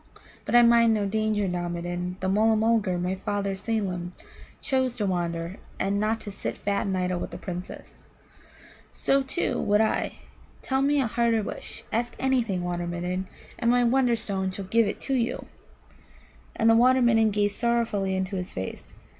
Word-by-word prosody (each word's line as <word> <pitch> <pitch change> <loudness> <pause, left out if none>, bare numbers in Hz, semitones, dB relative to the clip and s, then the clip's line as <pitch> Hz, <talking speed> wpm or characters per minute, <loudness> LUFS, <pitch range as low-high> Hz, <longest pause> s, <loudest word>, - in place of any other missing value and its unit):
But - - 0
I 240 - +8
mind 235 -1 +5
no 205 -1 0
danger 215 0 0
now, 175 -1 -2
Midden. 175 +1 -4
That 190 - 0
Mulla 220 +3 +3
mulgar, 215 -4 +2
my 180 +1 -1
father 200 +1 -2
Seelem, 190 -4 -3 0.5
chose 260 -2 0
to 210 - 0
wander, 170 -1 -2 0.2
and 200 +1 0
not 220 +2 0
to 205 - -7
sit - - -5
fat 200 0 -1
and 190 -1 0
idle 180 -1 -1
with - - -6
Princes. 180 -1 -8 0.8
So, 275 0 +2
too, 270 +6 -1
would 210 +1 +3
I. 220 - +1 0.5
Tell 265 0 0
me 285 +1 +3
a 265 - +2
harder 230 -1 +1
wish. - - -7
Ask 235 +2 -1
anything, 235 -9 0
Water 175 0 -2
midden, 180 +2 -3 0.3
and 235 - +1
my 245 0 +4
Wonderstone 230 -6 +1
shall 190 +1 -6
give 225 +3 +3
it 200 - -5
you." 255 -4 -1 1.1
And 225 - +2
the 225 - +7
Water 255 +2 +5
midden 225 -2 +4
gazed 205 0 0
sorrowfully 230 -5 0
into 190 +1 -2
his 180 -1 -5
face. 95 - -5
205 Hz, 170 wpm, -26 LUFS, 185-235 Hz, 1.1 s, I